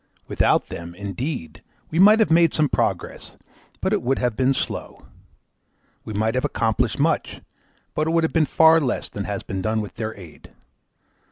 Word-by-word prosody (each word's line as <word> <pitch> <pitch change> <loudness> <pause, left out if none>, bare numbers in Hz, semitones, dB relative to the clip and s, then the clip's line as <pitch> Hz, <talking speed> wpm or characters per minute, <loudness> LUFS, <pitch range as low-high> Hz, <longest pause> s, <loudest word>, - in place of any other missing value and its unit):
Without - - +1
them, 85 0 -8
indeed, 100 - -5 0.3
we 165 - -1
might 210 +4 +7
have 220 - +2
made 165 -1 +4
some 155 -1 +2
progress, - - -3 0.4
but - - 0
it - - +1
would 135 +2 0
have 125 -3 -1
been 130 +2 +2
slow; 135 - -4 1.0
we - - -8
might 110 +2 0
have 130 - -1
accomplished 115 +1 0
much, 155 +2 0 0.5
but 155 - -1
it - - +1
would 165 0 +2
have 160 - -1
been 160 -3 +2
far 160 0 +5
less 130 -5 -2
than 100 - -5
has 100 -1 -4
been 95 0 -4
done 110 +3 0
with 105 -2 -7
their 110 -1 -4
aid. 85 -5 -14
125 Hz, 180 wpm, -22 LUFS, 105-160 Hz, 1.0 s, might